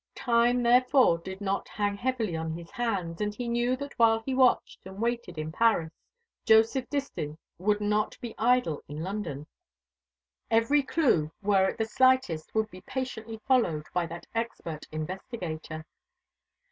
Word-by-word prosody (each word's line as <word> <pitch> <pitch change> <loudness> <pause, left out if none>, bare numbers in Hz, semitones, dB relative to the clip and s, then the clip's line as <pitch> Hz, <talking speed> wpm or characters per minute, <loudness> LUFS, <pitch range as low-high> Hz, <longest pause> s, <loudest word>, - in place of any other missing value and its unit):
Time 245 0 +2
therefore 250 -5 +5
did 190 +3 -8
not 195 0 -1
hang 205 -1 -1
heavily 225 -5 -1
on 160 0 -3
his 170 0 -9
hands; 195 -8 -2
and 210 0 -1
he 245 +1 -4
knew 240 +2 +1
that 280 +2 -7
while 225 -1 +5
he 265 - -1
watched 260 -1 +2
and 190 +1 -10
waited 235 -6 -2
in 155 0 -4
Paris, 180 -5 +2 0.5
Joseph 225 +3 +4
Distin 210 - -3 0.2
would 205 +3 +1
not 210 +1 0
be 235 -2 -6
idle 235 -10 +2
in 150 +2 -6
London. 175 -7 -4 1.0
Every 230 +6 +4
clue, 255 - +1
were 195 -2 +3
it - - -6
the 220 - 0
slightest, 255 -10 +2
would 220 -1 +1
be 185 - -11
patiently 225 -2 -5
followed 180 - +2
by 175 -2 0
that 170 +1 -8
expert 225 -9 -4
investigator. 160 -1 -5
215 Hz, 150 wpm, -28 LUFS, 170-240 Hz, 1.0 s, therefore